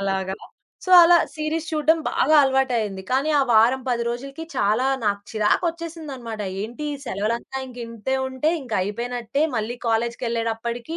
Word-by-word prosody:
అలాగా. 190 -1 -1 0.5
సో, 370 - -4
అలా 345 +1 +7 0.2
సీరీస్ 310 +1 -2
చూడడం 315 +1 +2
బాగా 310 - +2
అలవాటయింది. 245 -8 0
కానీ 275 +4 +1
ఆ - - +5
వారం, 235 +4 +5
10 240 -1 0
రోజులకి 275 +6 -5
చాలా 220 +6 +2 0.2
నాకు 200 -1 +1
చిరాకొచ్చేసిందన్నమాట. 280 -1 -2 0.2
ఏంటి 235 +8 -5
ఈ - - -3
సెలవులంతా 230 +6 -3
ఇంకింతే 240 0 -5
ఉంటే, 260 +4 0
ఇంకైపోయినట్టే 235 +3 -2
మళ్ళీ 225 +3 -2
కాలేజ్‌కెళ్ళేటప్పటికి 235 +3 -2
240 Hz, 125 wpm, -23 LUFS, 225-275 Hz, 0.5 s, అలా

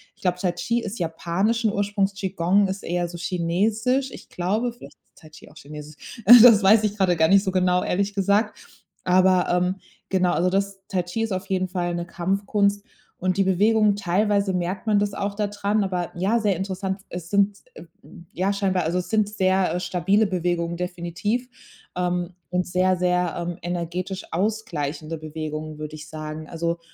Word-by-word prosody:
ich - - -28
glaube, 180 -1 0
Tai 180 -2 +1
Chi 235 +7 -1
ist 210 -1 -6
japanischen 190 +7 0
Ursprungs. 200 -1 0
Qi 195 -1 -4
Gong 195 +2 +2
ist 190 +1 -5
eher 175 0 -1
so 175 0 -8
chinesisch. 210 +10 0
Ich - - -11
glaube, 215 +7 -1
vielleicht 240 - -13
ist - - -45
Tai 155 - -14
Chi 150 - -15
auch 155 - -20
chinesisch. 150 - -11
Äh, 240 0 +11
das 230 -4 +8
weiß 215 +3 +6
ich 210 0 -1
grade 185 -3 +3
gar 160 0 +3
nicht 200 +1 +5
so 190 - -1
genau, 180 -1 +2
ehrlich 200 +2 -1
gesagt. 200 +2 +1 0.5
Aber, 185 0 +4
ähm, 180 +1 +1 0.3
genau, 185 -2 +2
also, 175 +4 +2
das 195 0 -1
Tai 185 -2 0
Chi 180 +6 -4
ist 220 - -3
auf 185 +1 -3
jeden 185 -1 0
Fall 175 -2 -2
'ne 170 0 -3
Kampfkunst 200 +3 0 0.3
und 185 +1 -1
die 195 - +4
Bewegungen, 205 +2 +3
teilweise 200 +1 +1
merkt 180 +4 -3
man 205 -1 +4
das 205 -1 -1
auch 200 0 -3
da 210 -1 0
dran, 205 +1 0
aber 180 -2 -2
ja, 205 +6 +1
sehr 205 -4 +1
interessant. 190 0 -3
Es 175 -1 -7
sind 200 0 +2 0.2
e - - -10
f 170 - -13 0.5
ja 190 +3 0
scheinbar 190 -3 0
also, 170 +3 0
es 180 - -6
sind 215 -2 +2
sehr, 190 -3 +1
äh, - - -1
stabile 185 +4 +1
Bewegungen 175 -2 -1
definitiv, 180 +7 -3 0.5
ähm, 180 0 -1 0.2
und 180 0 0
sehr, 185 +1 +2
sehr, 180 -1 +1
ähm, 175 0 -4
energetisch 175 +2 -4
ausgleichende 165 -6 -2
Bewegungen, 155 0 -6
würde 155 0 -6
ich 150 -1 -10
sagen. 155 0 -7
Also, 170 0 -2
185 Hz, 190 wpm, -23 LUFS, 175-200 Hz, 0.5 s, Äh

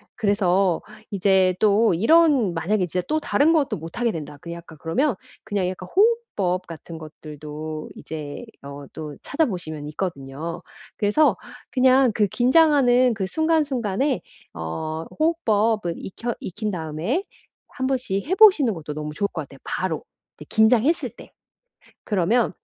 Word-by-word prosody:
그래서 195 -3 +2 0.3
이제 190 -2 +3
또 215 0 +4
이런 260 - +4
만약에 185 +4 0
진짜 180 +2 -2
또 310 +1 +1
'다른 305 +1 +3
것도 300 -4 +1
못하게 225 +9 -2
된다.' 150 -4 -7
그 170 - -8
약간 170 -2 -11
그러면 255 - +1 0.3
그냥 205 -4 -1
약간 185 0 -7
호흡법 380 - +1
같은 165 0 -9
것들도 155 0 -8
이제 155 +7 -7 0.2
어 140 0 -8
또 150 -2 -7
찾아 315 +3 +1
보시면 155 - -5
있거든요. 155 0 -5 0.4
그래서 210 +10 +3 0.3
그냥 260 -1 +4
그 210 -1 +2
긴장하는 255 - +4
그 200 -3 -2
순간순간에 275 -4 0 0.3
어 120 - -4
호흡법은 220 - +1
익혀 235 +5 -5
익힌 210 +3 -4
다음에 170 - -2 0.4
한번씩 255 -7 -2
해 375 - +1
보시는 375 - +6
것도 155 -4 -6
너무 150 0 -5
좋을 200 +6 0
것 160 - -3
같아요 135 -1 -15
바로, 180 -4 -2 0.3
네 150 - -11
긴장했을 235 +8 +3
때. - - -15 0.7
그러면 210 +4 +1
200 Hz, 290 characters per minute, -23 LUFS, 165-255 Hz, 0.7 s, 보시는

